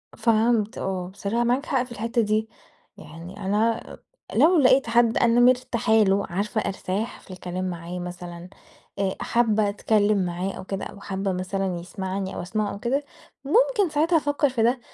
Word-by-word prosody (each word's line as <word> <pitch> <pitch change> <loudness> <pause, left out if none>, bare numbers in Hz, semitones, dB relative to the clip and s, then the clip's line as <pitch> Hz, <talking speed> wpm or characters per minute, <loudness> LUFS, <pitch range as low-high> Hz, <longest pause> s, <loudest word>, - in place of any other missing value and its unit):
فهمت 225 0 +2
آه، 185 -2 -3
بصراحة 200 +4 -2
معاك 250 +5 +1
حق 260 -3 +1
في 250 - -13
الحتة 230 +1 -1
دي. 215 +1 0 0.5
يعني 185 +2 -10
أنا 220 +3 0
أ - - -11 0.4
لو 340 +2 +5
لقيت 260 -2 +4
حد 235 0 +3
أنا 235 0 +4
مرتاحة 245 -2 +3
له، 200 -2 +4
عارفة 210 +5 -1
أرتاح 200 +4 -3
في - - -15
الكلام 185 0 -4
معاه 175 +1 -6
مثلًا 175 0 -8 0.5
آآ 190 -1 0
حابة 220 -3 +2
أتكلم 205 -1 +2
معاه 180 +2 -3
أو 190 - -8
كده 195 0 -4
أو 200 - -10
حابة 195 0 -3
مثلًا 185 0 -2
يسمعني 190 +2 -4
أو - - -4
أسمعه 205 +3 -2
أو 200 - -8
كده 265 +6 0 0.4
ممكن 435 - +3
ساعتها 315 +3 +2
أفكر 290 -1 +1
في 240 -3 0
ده 245 +3 +2
210 Hz, 170 wpm, -24 LUFS, 190-240 Hz, 0.5 s, لو